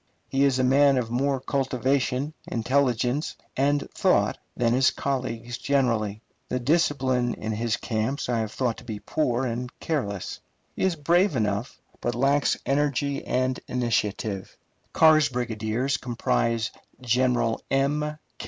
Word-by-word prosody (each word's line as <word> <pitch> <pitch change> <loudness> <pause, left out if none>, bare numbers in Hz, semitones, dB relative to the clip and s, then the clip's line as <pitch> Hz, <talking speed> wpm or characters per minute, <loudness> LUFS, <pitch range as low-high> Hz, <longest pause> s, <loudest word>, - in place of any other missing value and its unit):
He 135 +1 +3
is 135 -2 +2
a 130 - +2
man 135 +1 +5
of 115 -2 -1
more 135 +2 +1
cultivation, 135 +1 0
intelligence, 125 +3 0 0.2
and 145 +2 +1
thought - - +2 0.2
than 120 -1 +2
his 130 +1 +4
colleagues 120 -3 -3
generally. 115 -6 0 0.3
The 125 - -1
discipline 130 -4 +1
in 110 - -4
his 110 0 -1
camps 115 +5 -2
I 120 -2 0
have 110 -1 -2
thought 120 -3 -1
to - - -11
be 110 -3 -6
poor 130 -2 0
and 125 +1 -3
careless. 100 - -3 0.4
He - - -5
is 185 -3 +1
brave 170 +3 +2
enough, 105 +1 -1 0.2
but 120 -1 -1
lacks 140 +2 +2
energy 140 0 0
and 130 0 0
initiative. 110 -5 -1 0.3
Carr's 155 -2 +5
brigadiers 120 +2 -1
comprise 115 -1 0 0.3
General 120 -1 +1
M. 150 +3 0
125 Hz, 135 wpm, -26 LUFS, 115-140 Hz, 0.4 s, man